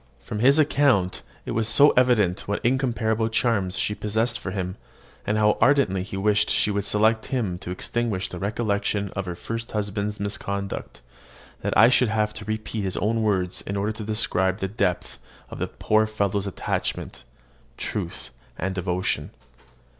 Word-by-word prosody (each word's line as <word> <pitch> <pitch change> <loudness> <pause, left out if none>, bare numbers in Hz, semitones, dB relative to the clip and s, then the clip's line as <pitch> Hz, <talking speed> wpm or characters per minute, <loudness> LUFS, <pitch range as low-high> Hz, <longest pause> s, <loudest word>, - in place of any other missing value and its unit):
From 105 - -6
his 135 +6 +5
account 140 -11 +3 0.2
it - - -4
was 110 -1 +1
so 145 +6 +6
evident 110 -8 +2
what 100 +2 -2
incomparable 115 -3 +1
charms 105 -4 +1
she 105 - 0
possessed 110 +4 -1
for 95 - -5
him, 95 -1 -3 0.5
and 105 - +1
how 105 0 +3
ardently 135 -9 +4
he 95 +1 -6
wished 105 +1 +2
she 105 - +3
would 100 0 -1
select 110 +2 +2
him 105 -9 -2
to - - -8
extinguish 100 +1 -2
the 90 - -8
recollection 100 -1 -1
of 95 -1 -4
her 90 - -3
first 115 +5 -5
husband's 105 0 -2
misconduct, 100 -1 -4 0.6
that - - 0
I 115 +2 +8
should 125 -2 +3
have 105 -1 0
to 105 0 -7
repeat 110 0 -3
his 95 -2 -3
own 115 +2 +1
words 95 -4 0
in 100 - -4
order 100 +2 0
to 110 0 -6
describe 95 -3 +1
the 95 - -2
depth 90 -3 -2 0.3
of - - -7
the - - -1
poor 110 0 +1
fellow's 100 -2 -1
attachment, 95 - -3 0.5
truth, - - -5 0.3
and 95 +2 -2
devotion. 90 0 -1
105 Hz, 165 wpm, -24 LUFS, 95-115 Hz, 0.6 s, I